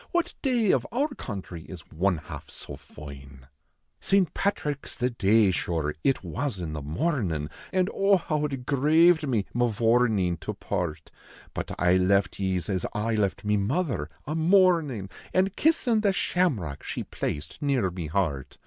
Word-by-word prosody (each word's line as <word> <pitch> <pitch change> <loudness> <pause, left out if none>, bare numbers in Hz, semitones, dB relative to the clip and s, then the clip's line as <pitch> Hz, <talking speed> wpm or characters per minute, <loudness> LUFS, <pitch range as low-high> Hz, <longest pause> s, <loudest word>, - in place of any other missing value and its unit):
What 345 -1 0
day 240 -7 +2
of - - +1
our 280 +6 +1
country 95 - -7
is 90 -3 -9
one 90 +2 +1
half 80 - -9
so 70 - -8
foine? 70 -2 -12 0.5
St. 195 -5 +2
Patrick 150 -8 -1
s - - -7
the 125 +1 0
dav, 110 -2 +4
shure, 80 -4 -1
it 135 - +2
was 140 -5 -3
in 85 -4 -4
the 75 - -4
mornin, 80 - -1 0.2
An 185 -1 +2
oh! 195 0 +4
how 155 -3 -1
it 135 -4 -4
graved 155 +4 +4
me, 115 -6 +1
Mavourneen, 115 -5 +2
to - - -5
part; 80 -3 -4 0.4
But - - -4
I 90 +1 +4
left 95 +1 +2
ye 95 -1 0
s 85 - -4
as 95 -2 -1
I 110 +2 -1
left 105 -2 0
me 105 0 +2
mother, 115 - -1 0.2
a 150 - -3
mournin 160 - +3 0.2
An 190 +1 +3
kissin 245 - +2
the 205 -2 +3
shamrock 125 - 0
she - - -4
placed 75 - -5
near 130 -10 +1
me 85 -3 -5
heart. 75 -5 -2
110 Hz, 165 wpm, -27 LUFS, -, 0.5 s, dav